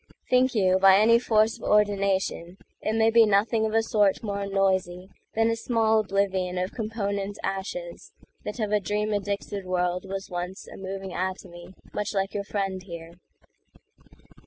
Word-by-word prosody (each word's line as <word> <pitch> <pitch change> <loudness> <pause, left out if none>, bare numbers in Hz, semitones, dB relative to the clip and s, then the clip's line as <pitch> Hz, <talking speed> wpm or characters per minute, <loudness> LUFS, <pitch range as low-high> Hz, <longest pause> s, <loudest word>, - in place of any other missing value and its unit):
Think 255 0 +3
you 190 -3 +3
by 195 0 +7
any 230 +3 +5
force 220 -1 +2
of - - -14
ordinationIt 200 -4 +1 0.3
may 220 +1 +2
be 230 0 +7
nothing 220 +2 +2
of 220 - -3
a 225 - +4
sort 210 -2 +2
more 200 -2 -3
noisyThan 190 -1 0 0.4
a - - 0
small 225 -1 +2
oblivion 190 -3 0
of 185 +1 -2
component 205 -3 -3
ashesThat 210 - -6
of 210 -2 -1
a 210 - +3
dream 210 +2 -1
addicted 200 0 -3
world 180 0 -1
was 195 0 -5
onceA 180 +1 -6
moving 190 -1 -6
atomy 185 -1 -5 0.2
much 210 0 -3
like 195 0 -1
your 205 - -2
friend 195 -2 -2
here?" 170 -2 -9
200 Hz, 145 wpm, -26 LUFS, 190-215 Hz, 0.4 s, by